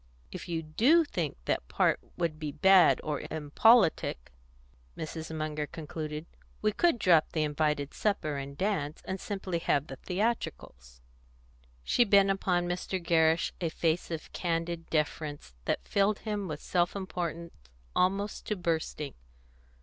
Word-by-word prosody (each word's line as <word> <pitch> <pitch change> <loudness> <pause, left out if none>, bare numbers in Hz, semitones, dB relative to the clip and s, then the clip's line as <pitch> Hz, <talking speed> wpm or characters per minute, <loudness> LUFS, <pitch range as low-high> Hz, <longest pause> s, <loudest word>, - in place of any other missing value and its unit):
"If - - -7
you 165 -1 -2
do 250 - +4
think - - -3
that - - -1
part - - +2 0.2
would 165 -3 -1
be 150 -2 -3
bad 190 +1 +6
or 150 -2 -2
impolitic," 160 - +3 0.7
Mrs. 160 0 -5
Munger 150 -1 -2
concluded, 155 0 -6 0.3
"we 215 - +2
could 340 - +2
drop 170 -7 +4
the 155 - +1
invited 150 -1 0
supper 200 -8 -1
and 140 0 -5
the 140 - -4
dance, 165 -7 -1
and 190 0 -3
simply 190 -4 -3
have 145 -3 +1
the 135 -3 -9
theatricals." 65 - -3 0.8
She 240 - +4
bent 200 -3 +5
upon 180 -2 0
Mr. 180 +1 -2
Gerrish 165 -1 +2
a 170 - 0
face 165 +1 0
of 165 -2 -6
candid 165 -1 -2
deference 150 - -2
that - - -1
filled 200 +1 +2
him 210 -3 -3
with 150 -2 -6
self 175 0 +1
importance 170 -3 -4 0.4
almost 195 +3 0
to 210 - 0
bursting. 160 -5 -2
165 Hz, 140 wpm, -30 LUFS, 155-195 Hz, 0.8 s, bad